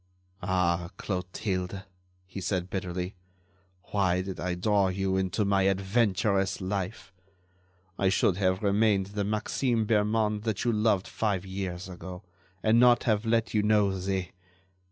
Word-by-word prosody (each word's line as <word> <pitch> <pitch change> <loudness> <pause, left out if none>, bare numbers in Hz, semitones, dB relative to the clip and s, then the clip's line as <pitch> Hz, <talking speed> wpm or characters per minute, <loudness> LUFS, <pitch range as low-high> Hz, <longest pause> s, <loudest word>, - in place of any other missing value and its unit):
"Ah, 90 -3 0
Clotilde," 90 0 -3 0.4
he 95 +1 -7
said, 90 -1 -2
bitterly, 90 0 -3 0.8
"why 95 -3 +2
did 95 -1 -6
I 90 0 -2
draw 100 +1 +2
you 95 0 -1
into 95 +2 0
my 100 -1 +2
adventurous 95 -1 +1
life? 95 0 -4 0.9
I 95 - +3
should 95 -1 +2
have 95 0 +1
remained 100 -1 +2
the 105 -1 -1
Maxime 110 +3 0
Bermond 105 0 +1
that 110 0 -2
you 120 - +3
loved 105 -3 +1
five 100 -4 -1
years 95 -2 -5
ago, 90 +1 -8 0.4
and 110 +2 +4
not 120 -1 +5
have 110 -1 +1
let 115 0 +1
you 105 - +3
know 105 -2 +3
the 95 -1 -2
95 Hz, 135 wpm, -28 LUFS, 95-105 Hz, 0.9 s, not